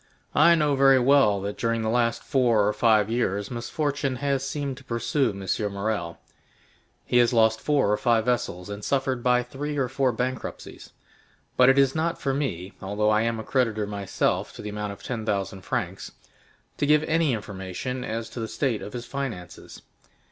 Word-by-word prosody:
"I 170 - +6
know 150 -3 +2
very 135 0 +6
well 130 -5 +4
that 100 +1 -5
during 115 0 0
the - - -1
last 115 0 +1
four 120 -7 +2
or 105 - +1
five 110 -3 +3
years 105 -3 -1
misfortune 140 +2 -2
has 135 0 -1
seemed 140 -1 -3
to 135 - -13
pursue 130 +3 0
M. 100 +1 -3
Morrel. 100 -4 -3 0.9
He 125 - +1
has 120 +1 +4
lost 110 -1 +3
four 140 -8 +2
or 105 - +2
five 115 -2 +2
vessels, 120 -8 -1
and 100 0 -7
suffered 135 -1 0
by 125 0 +3
three 145 +4 -5
or 135 -2 +1
four 130 0 +1
bankruptcies; 130 +1 -5 0.6
but 125 0 +6
it 135 - +4
is 135 -1 +4
not 165 +1 -1
for 135 - -1
me, 100 - -3
although 105 +2 0
I 110 0 +3
am 115 0 -1
a - - -5
creditor 115 -4 0
myself 100 -2 -1
to - - -9
the 105 - -5
amount 105 0 -4
of 100 - -11
ten 120 -3 -4
thousand 100 -2 -2
francs, - - -4 0.7
to 145 - 0
give 150 +1 +4
any 160 -3 +1
information 105 +4 -5
as 115 -1 -4
to - - -7
the 110 - -3
state 120 -3 -1
of 105 - -8
his 120 -1 -5
finances. 120 - -7
120 Hz, 185 wpm, -25 LUFS, 105-135 Hz, 0.9 s, I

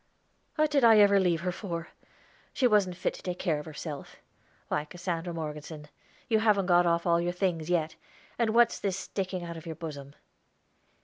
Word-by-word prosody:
"What 310 -1 +2
did 280 -3 +3
I 225 -2 +7
ever 200 -1 +6
leave 175 -3 +1
her 180 0 -1
for? 170 -3 -5 0.6
She 260 - +1
wasn't 200 -6 +3
fit - - -1
to - - -11
take 180 -1 -4
care 165 -6 0
of 150 - -9
herself. 150 -2 -7 0.5
Why, 150 - -1
Cassandra 175 +1 -4
Morgeson, 150 -1 -7 0.4
you 220 -2 +3
haven't 210 -3 +3
got 175 -1 +4
off 170 0 +1
all 170 -1 +3
your 175 +1 -1
things 175 -3 -1
yet. 160 -3 0 0.4
And 225 -1 +1
what's 240 0 +4
this 195 -2 -1
sticking 190 -2 -4
out 170 -1 -6
of 165 +1 -10
your 160 - -5
bosom?" 145 -4 -8
175 Hz, 185 wpm, -29 LUFS, 165-195 Hz, 0.6 s, I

